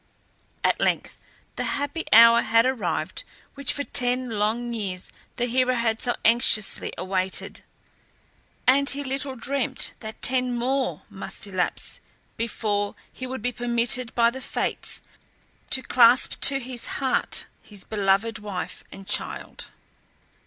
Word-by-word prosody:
At - - +2
length - - 0 0.4
the - - -1
happy 285 +3 -3
hour 230 +1 +8
had 230 +1 +3
arrived 260 -2 -2 0.3
which 280 -2 -1
for 285 - -1
ten 250 -1 +1
long 225 +3 -1
years 190 -5 -4 0.2
the 245 - -1
hero 255 +1 +1
had 230 -2 0
so 245 - +1
anxiously 230 -3 +4
awaited, 185 0 -2 1.0
and 280 +2 +4
he 285 +1 0
little 270 0 -3
dreamt 265 +2 -2
that 220 -1 -8
ten 255 -1 +2
more 260 +2 -1
must - - -6
elapse - - -2 0.3
before 210 -3 -2 0.2
he 255 - -6
would 255 -3 -6
be 245 - 0
permitted 240 0 0
by 235 -1 +4
the 265 +2 -7
Fates - - -3 0.7
to 260 - +3
clasp 245 0 +5
to 275 -1 +4
his 250 -1 -4
heart 260 -2 0 0.2
his 205 -3 -10
beloved 210 +1 0
wife 205 -3 -6
and 195 0 -11
child. 210 - -3
240 Hz, 130 wpm, -25 LUFS, 220-260 Hz, 1.0 s, hour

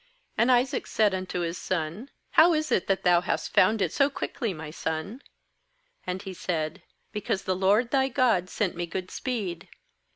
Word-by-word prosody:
20And 235 - +4
Isaac 250 +1 +2
said 210 -3 +2
unto 185 -1 -3
Ms 170 +1 -3
son: 185 - -3 0.2
'How 335 +2 +6
is 310 0 -1
it - - +1
that 195 -1 0
thou 175 -1 +5
hast - - -2
found 210 +2 +4
it - - -2
so 280 0 +3
quickly, 240 -5 -3
my 155 -3 -7
son?' 160 - -4 0.9
And 185 +2 -3
he 190 -2 -6
said: 170 0 -3 0.3
'Because 200 -2 -2
the 185 - 0
LORD 205 +6 +2
thy 265 -1 +3
God 235 -9 +2
sent 200 -2 -1
me 175 0 -3
good 185 +2 -5
speed.' 205 -10 -4
190 Hz, 175 wpm, -27 LUFS, 175-240 Hz, 0.9 s, How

